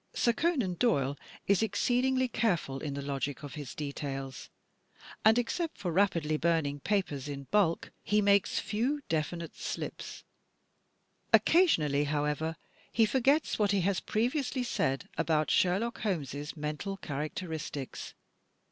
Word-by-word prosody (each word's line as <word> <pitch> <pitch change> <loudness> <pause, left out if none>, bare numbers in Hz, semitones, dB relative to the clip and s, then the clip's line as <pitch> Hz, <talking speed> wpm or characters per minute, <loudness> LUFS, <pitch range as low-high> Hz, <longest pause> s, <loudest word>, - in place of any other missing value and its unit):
Sir 235 - +3
Conan 260 - +1
Doyle 140 - +2 0.3
is 200 0 +3
exceedingly 255 +4 +2
careful 185 - 0
in 145 -1 -4
the 140 - -4
logic 140 +1 -3
of 145 - -7
his 145 -4 -7
details; 135 -2 -5 0.7
and, 220 +3 +6
except 320 +7 -1
for 185 -4 -2
rapidly 165 -4 +2
burning 155 -4 +1
papers 150 -7 -1
in 140 -1 -5
bulk, 195 -6 +2
he 210 - +2
makes 200 -1 +3
few 250 +8 0
definite 165 +1 -2
slips. - - -5 1.1
Occasionally, 150 - +4
however, 150 +2 -1 0.4
he 225 - +4
forgets 270 +7 +2
what 205 -1 +3
he 200 - +2
has 190 +1 +1
previously 250 +3 0
said 135 - -1
about 155 -1 +2
Sherlock 195 +6 +2
Holmes' 150 - -3
mental 150 +6 -3
characteristics. 155 -2 -5
175 Hz, 125 wpm, -31 LUFS, 145-220 Hz, 1.1 s, and